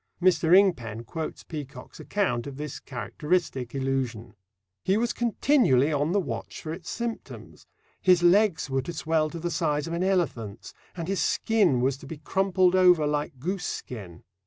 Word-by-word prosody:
Mr. 175 Hz, -1 st, +5 dB
Ingpen 120 Hz, -, +1 dB
quotes 160 Hz, +7 st, -5 dB
Peacock's 145 Hz, -5 st, -9 dB
account 125 Hz, -, -1 dB
of 135 Hz, -1 st, -8 dB
this 150 Hz, -1 st, -5 dB
characteristic 135 Hz, -, -2 dB
illusion: 130 Hz, -5 st, -2 dB, 0.5 s
He 190 Hz, +2 st, +2 dB
was 235 Hz, +1 st, 0 dB
continually 220 Hz, -, +3 dB
on 145 Hz, +3 st, +1 dB
the 200 Hz, -, +2 dB
watch 185 Hz, -, -5 dB
for 155 Hz, -, -4 dB
its 170 Hz, 0 st, -8 dB
symptoms; 235 Hz, -1 st, -6 dB, 0.3 s
his 180 Hz, -2 st, +4 dB
legs 190 Hz, -1 st, +4 dB
were 135 Hz, -1 st, 0 dB
to 170 Hz, +6 st, -6 dB
swell 160 Hz, -1 st, 0 dB
to 170 Hz, -, -7 dB
the 170 Hz, +1 st, -3 dB
size 150 Hz, -2 st, 0 dB
of 165 Hz, -, -5 dB
an 170 Hz, +2 st, -1 dB
elephant's, 145 Hz, -, -1 dB, 0.2 s
and 165 Hz, -1 st, -4 dB
his 195 Hz, 0 st, 0 dB
skin 200 Hz, -, +2 dB
was 135 Hz, +1 st, +1 dB
to 140 Hz, -, -12 dB
be 160 Hz, -, -7 dB
crumpled 185 Hz, +3 st, +2 dB
over 180 Hz, -4 st, +5 dB
like 150 Hz, -1 st, -2 dB
goose 180 Hz, +7 st, -3 dB
skin. 95 Hz, -8 st, -7 dB
160 Hz, 165 wpm, -26 LUFS, 135-185 Hz, 0.5 s, Mr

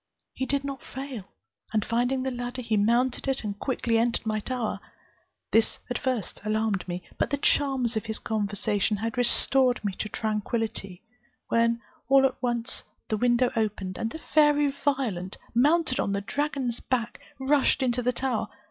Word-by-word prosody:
He 260 Hz, -, -3 dB
did 280 Hz, 0 st, 0 dB
not 275 Hz, -2 st, -5 dB
fail, 265 Hz, -6 st, -7 dB, 0.5 s
and 215 Hz, -1 st, +1 dB
finding 245 Hz, +3 st, +1 dB
the 265 Hz, -, -1 dB
ladder, 245 Hz, +1 st, -4 dB
mounted 235 Hz, +6 st, +2 dB
it, 270 Hz, -2 st, 0 dB
and 205 Hz, -1 st, -4 dB
quickly 235 Hz, -4 st, +1 dB
entered 235 Hz, 0 st, +1 dB
my 215 Hz, -1 st, 0 dB
tower. 240 Hz, 0 st, -2 dB, 0.7 s
This 225 Hz, 0 st, +3 dB
at 245 Hz, -, -1 dB
first 255 Hz, -8 st, -2 dB
alarmed 215 Hz, -3 st, 0 dB
me; 175 Hz, 0 st, -4 dB, 0.2 s
but -, -, +1 dB
the 285 Hz, -, 0 dB
charms 265 Hz, -4 st, +2 dB
of 220 Hz, +1 st, -2 dB
his 220 Hz, -, -2 dB
conversation 205 Hz, -1 st, 0 dB
had 225 Hz, +4 st, -3 dB
restored 250 Hz, 0 st, +3 dB
me 200 Hz, -, 0 dB
to 215 Hz, -, -2 dB
tranquillity, 215 Hz, -3 st, -2 dB, 0.5 s
when 230 Hz, 0 st, +2 dB, 0.3 s
all 270 Hz, 0 st, +7 dB
at 270 Hz, -, -1 dB
once 240 Hz, 0 st, -2 dB, 0.3 s
the 215 Hz, -, +1 dB
window 245 Hz, +2 st, +3 dB
opened, 205 Hz, -4 st, -1 dB
and 225 Hz, -, -1 dB
the 280 Hz, -, -6 dB
fairy 295 Hz, -2 st, +3 dB
Violent, 260 Hz, -10 st, -1 dB, 0.2 s
mounted 290 Hz, +3 st, +3 dB
on 200 Hz, -, 0 dB
the 200 Hz, -, 0 dB
dragon's 275 Hz, 0 st, -1 dB
back, 240 Hz, -3 st, -2 dB, 0.2 s
rushed 270 Hz, 0 st, +3 dB
into 250 Hz, -1 st, +1 dB
the 250 Hz, +1 st, +2 dB
tower. 245 Hz, -4 st, -1 dB
240 Hz, 165 wpm, -27 LUFS, 215-265 Hz, 0.7 s, all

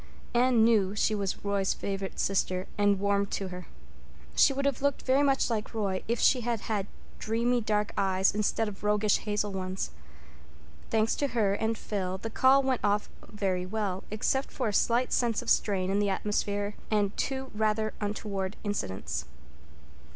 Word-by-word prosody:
Anne 240 Hz, -1 st, +4 dB
knew 210 Hz, -4 st, +3 dB
she 215 Hz, -, +2 dB
was 200 Hz, -1 st, -3 dB
Roy's 200 Hz, -1 st, +1 dB
favorite 195 Hz, -1 st, -4 dB
sister 185 Hz, -1 st, 0 dB
and 205 Hz, -1 st, +3 dB
warmed 200 Hz, 0 st, +1 dB
to 195 Hz, -2 st, -3 dB
her. 180 Hz, 0 st, -8 dB, 0.7 s
She -, -, +6 dB
would 275 Hz, +1 st, -2 dB
have 280 Hz, -3 st, 0 dB
looked 280 Hz, -1 st, 0 dB
very 265 Hz, +2 st, +3 dB
much 275 Hz, -2 st, +3 dB
like 225 Hz, -1 st, -3 dB
Roy 195 Hz, -4 st, -1 dB
if 235 Hz, +1 st, 0 dB
she 255 Hz, -, +4 dB
had 235 Hz, -2 st, -1 dB
had 205 Hz, -3 st, -2 dB, 0.3 s
dreamy 235 Hz, +2 st, +1 dB
dark 210 Hz, -1 st, 0 dB
eyes 190 Hz, -1 st, +2 dB
instead 215 Hz, +2 st, 0 dB
of 210 Hz, 0 st, -8 dB
roguish 210 Hz, 0 st, +2 dB
hazel 210 Hz, -1 st, -1 dB
ones. 190 Hz, 0 st, -3 dB, 1.0 s
Thanks 220 Hz, 0 st, +2 dB
to 285 Hz, -, +1 dB
her 200 Hz, -3 st, +3 dB
and 220 Hz, +2 st, -1 dB
Phil, 190 Hz, -3 st, -3 dB
the 225 Hz, +4 st, -6 dB
call 270 Hz, +3 st, +5 dB
really 265 Hz, -, 0 dB
went 255 Hz, -, 0 dB
off 205 Hz, 0 st, +1 dB, 0.2 s
very 190 Hz, -4 st, -1 dB
well, 195 Hz, -2 st, -2 dB
except 265 Hz, +6 st, 0 dB
for 250 Hz, -5 st, -2 dB
a -, -, -3 dB
slight 240 Hz, +4 st, +2 dB
sense 235 Hz, -3 st, +1 dB
of -, -, 0 dB
strain 190 Hz, -2 st, +2 dB
in 200 Hz, -, +2 dB
the 205 Hz, -1 st, +1 dB
atmosphere 205 Hz, +1 st, -1 dB, 0.2 s
and 205 Hz, -2 st, +1 dB
two 265 Hz, -1 st, -3 dB
rather 215 Hz, 0 st, 0 dB
untoward 205 Hz, -2 st, -3 dB
incidents. 95 Hz, -, -3 dB
210 Hz, 175 wpm, -29 LUFS, 195-225 Hz, 1.0 s, She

